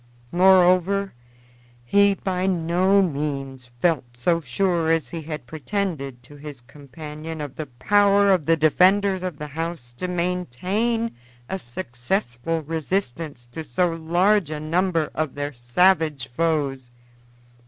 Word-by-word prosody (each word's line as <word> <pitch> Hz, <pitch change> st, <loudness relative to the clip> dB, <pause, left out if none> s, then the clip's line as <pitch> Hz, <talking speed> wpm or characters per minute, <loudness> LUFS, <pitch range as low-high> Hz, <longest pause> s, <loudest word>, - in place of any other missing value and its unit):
Moreover, 185 Hz, +1 st, +4 dB, 0.7 s
he 200 Hz, +8 st, +4 dB
by 185 Hz, -1 st, -2 dB
no 185 Hz, +2 st, +3 dB
means 135 Hz, -5 st, -4 dB
felt 135 Hz, -8 st, 0 dB
so 170 Hz, +7 st, +1 dB
sure 165 Hz, +4 st, 0 dB
as 165 Hz, -2 st, 0 dB
he 165 Hz, -, -5 dB
had 150 Hz, -4 st, -6 dB
pretended 150 Hz, -, -4 dB
to 145 Hz, +4 st, -14 dB
his 145 Hz, -3 st, -9 dB
companion 150 Hz, +4 st, -9 dB
of 145 Hz, -3 st, -6 dB
the 155 Hz, -, -5 dB
power 200 Hz, +9 st, +3 dB
of 180 Hz, -6 st, +1 dB
the 165 Hz, 0 st, +4 dB
defenders 185 Hz, +5 st, +3 dB
of 180 Hz, -5 st, -4 dB
the 150 Hz, -, -6 dB
house 160 Hz, -5 st, -5 dB
to 180 Hz, -, -3 dB
maintain 180 Hz, -, -1 dB, 0.3 s
a 190 Hz, -, -3 dB
successful 120 Hz, -, -3 dB
resistance 160 Hz, -4 st, -3 dB
to 160 Hz, -, -6 dB
so 170 Hz, +6 st, 0 dB
large 175 Hz, +3 st, +2 dB
a 155 Hz, -1 st, -4 dB
number 165 Hz, +1 st, 0 dB
of 155 Hz, -4 st, -2 dB
their 145 Hz, 0 st, -3 dB
savage 150 Hz, +3 st, +2 dB
foes. 140 Hz, -6 st, 0 dB
165 Hz, 130 wpm, -23 LUFS, 145-185 Hz, 0.7 s, Moreover